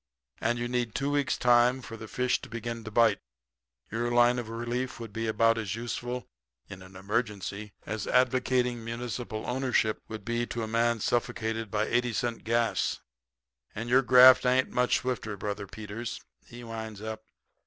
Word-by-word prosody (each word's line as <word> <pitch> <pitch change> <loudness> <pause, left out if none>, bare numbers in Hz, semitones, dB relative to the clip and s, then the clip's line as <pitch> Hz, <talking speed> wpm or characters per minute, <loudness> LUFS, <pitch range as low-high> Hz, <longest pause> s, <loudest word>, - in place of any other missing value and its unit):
And 120 +1 0
you 120 0 -2
need 120 -2 -2
two 140 +1 0
weeks' 145 -2 +1
time 125 +1 +4
for 115 - -8
the 110 0 -9
fish 125 +3 0
to - - -10
begin 115 0 -5
to - - -5
bite. 115 +1 +4 0.7
Your 120 +2 -1
line 120 +1 +4
of 115 -2 -6
relief 120 +3 -3
would 115 -3 -8
be 115 0 -2
about 115 +1 +3
as 105 -2 -3
useful 120 +1 -4 0.4
in 95 -2 -10
an 95 0 -14
emergency 105 0 -3
as 110 -1 -4
advocating 125 -1 +2
municipal 115 -1 -5
ownership 125 -4 0
to 110 - -4 0.3
cure 115 -2 -3
a - - -7
man 115 0 +1
suffocated 115 -1 -1
by 105 +1 0
eighty 120 +1 0
cent 115 +2 -2
gas. 115 0 +1 0.8
And 115 +2 -4
your 130 +2 +6
graft 130 0 +8
ain't 130 +1 +2
much 125 0 +2
swifter, 115 -5 -3
Brother 100 0 -4
Peters,' 110 +3 -6 0.3
he 120 +1 -10
winds 110 -2 -7
up. 110 0 -5
115 Hz, 165 wpm, -29 LUFS, 110-125 Hz, 0.8 s, graft